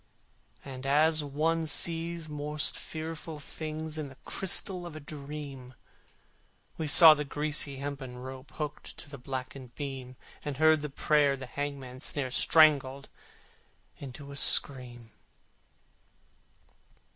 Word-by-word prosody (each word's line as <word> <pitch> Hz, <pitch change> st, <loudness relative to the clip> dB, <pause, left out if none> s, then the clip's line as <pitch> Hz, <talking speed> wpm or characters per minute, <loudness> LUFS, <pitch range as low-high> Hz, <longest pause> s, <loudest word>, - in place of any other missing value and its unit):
And 135 Hz, -1 st, -7 dB
as 155 Hz, +2 st, +3 dB
one 160 Hz, +3 st, 0 dB
sees 165 Hz, +1 st, 0 dB
most 150 Hz, 0 st, -1 dB
fearful 160 Hz, -1 st, -6 dB
things 155 Hz, +1 st, -6 dB
In 150 Hz, -, -4 dB
the 130 Hz, -, -15 dB
crystal 185 Hz, -1 st, -1 dB
of 165 Hz, -, -10 dB
a -, -, -6 dB
dream, 140 Hz, -3 st, -8 dB, 1.0 s
We 160 Hz, -, -3 dB
saw 155 Hz, +2 st, +10 dB
the 150 Hz, 0 st, -2 dB
greasy 145 Hz, 0 st, 0 dB
hempen 135 Hz, -2 st, -6 dB
rope 130 Hz, +2 st, -9 dB
Hooked 150 Hz, -2 st, -6 dB
to -, -, -8 dB
the 140 Hz, -, -8 dB
blackened 130 Hz, -1 st, -7 dB
beam, 135 Hz, -3 st, -6 dB, 0.3 s
And 145 Hz, -2 st, -4 dB
heard 155 Hz, 0 st, +5 dB
the 150 Hz, -, -4 dB
prayer 145 Hz, 0 st, +2 dB
the 130 Hz, -, -7 dB
hangman's 135 Hz, 0 st, -6 dB
snare 135 Hz, -3 st, -3 dB
Strangled 140 Hz, -1 st, +4 dB, 0.9 s
into 140 Hz, +1 st, -9 dB
a -, -, -8 dB
scream. 125 Hz, -4 st, +3 dB
145 Hz, 120 wpm, -29 LUFS, 135-155 Hz, 1.0 s, saw